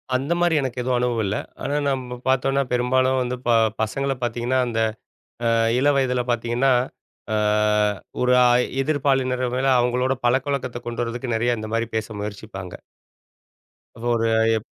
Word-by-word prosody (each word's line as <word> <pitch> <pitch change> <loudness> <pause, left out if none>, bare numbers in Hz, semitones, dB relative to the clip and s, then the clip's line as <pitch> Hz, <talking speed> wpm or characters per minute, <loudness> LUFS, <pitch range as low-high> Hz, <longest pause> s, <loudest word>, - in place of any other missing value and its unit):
அந்தமாரி 170 +5 +1
எனக்கு 130 -2 -4
எதுவும் 125 0 0
அனுபவம் 120 -3 0
இல்ல. 100 +1 -1 0.3
ஆனா, 140 +2 -1
நம்ம 125 -2 -3
பார்த்தோன்னா 135 +1 +2
பெரும்பாலும் 130 +1 +2
வந்து 125 0 -2
ப - - +2 0.3
பசங்கள 135 +5 -1
பார்த்தீங்கன்னா 120 +2 0
அந்த 115 -1 -2 0.7
அ - - +3 0.3
இள 140 +3 +3
வயதில 125 -2 +1
பார்த்தீங்கன்னா, 120 +3 +1 0.6
ஆ - - +2 0.9
ஒரு 125 0 +3
அ - - +6 0.4
எதிர்ப்பாலினர் 135 -3 +1
மேல 135 - 0
அவுங்களோட 125 +2 +1
பழக்கவழக்கத்த 130 -1 0
கொண்டு 120 0 -2
வர்றதுக்கு 120 +1 -3
நெறையா 120 +1 +1
இந்தமாரி 115 +1 -2
பேச 110 -1 -1
முயற்சிப்பாங்க. 100 -3 -7 1.4
ஒரு 115 -1 +1
அ - - +3 0.2
எப் 110 - -7
125 Hz, 140 wpm, -23 LUFS, 120-130 Hz, 1.4 s, அ